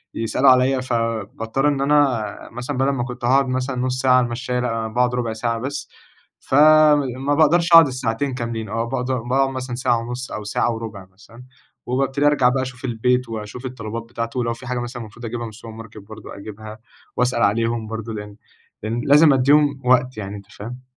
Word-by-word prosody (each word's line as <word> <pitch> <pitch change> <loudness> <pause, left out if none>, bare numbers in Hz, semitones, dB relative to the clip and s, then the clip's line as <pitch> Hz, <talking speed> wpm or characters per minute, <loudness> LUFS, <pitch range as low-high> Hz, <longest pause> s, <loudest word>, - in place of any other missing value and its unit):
يسألوا 115 +4 +2
عليَّ، 130 +1 +4
فباضطر 115 +2 -2
إن 140 -2 0
أنا 140 -6 +3 0.3
مثلًا 125 +4 -5
بدل 135 +1 +2
ما 135 -3 -1
كنت 125 0 -6
هاقعد 135 +2 +3
مثلًا 130 +1 -2
نص 130 0 -2
ساعة 130 -1 +4
على 125 - +3
المشَّاية، 125 +1 -3
لا، 115 -2 -2
باقعد 125 +2 0
ربع 120 -2 -2
ساعة 115 +1 -2
بس، 140 +4 -5 0.5
فما 145 -2 +4
باقدرش 170 +2 +3
أقعد 165 -3 +10
الساعتين 130 +1 -2
كاملين، 115 -3 -4
أو 115 +2 -2
باقدر 125 0 -2
باقعد 135 +3 +1
مثلًا 130 -2 -5
ساعة 125 -1 +1
ونص، 125 +2 -6
أو 105 - -5
ساعة 110 +3 0
وربع 110 -4 -7
مثلًا، 115 +5 -16 0.4
وبابتدي 135 +3 0
أرجع 135 -4 +4
بقى 130 +1 0
أشوف 130 0 -8
البيت، 125 +1 0
وأشوف 110 +3 -7
الطلبات 115 -2 -5
بتاعته، 115 +1 -5
ولو 115 -1 -1
في 125 +2 -11
حاجة 125 -1 -2
مثلًا 120 0 -6
المفروض 110 +3 -11
أجيبها 120 +1 -4
من - - -6
السوبرماركت 110 0 -11
برضه 105 +1 -11
أجيبها، 110 +1 -9 0.4
وأسأل 125 -1 +1
عليهم 115 +1 0
برضه، 110 0 -5
لأن 105 -1 -8 0.5
لأن 115 +2 -2
لازم 150 +1 +6
أديهم 140 +1 +3
وقت 125 -1 +2
يعني، 100 -1 -5
أنت 100 - -12
فاهم؟ 125 +5 -9
125 Hz, 185 wpm, -21 LUFS, 115-130 Hz, 0.5 s, أقعد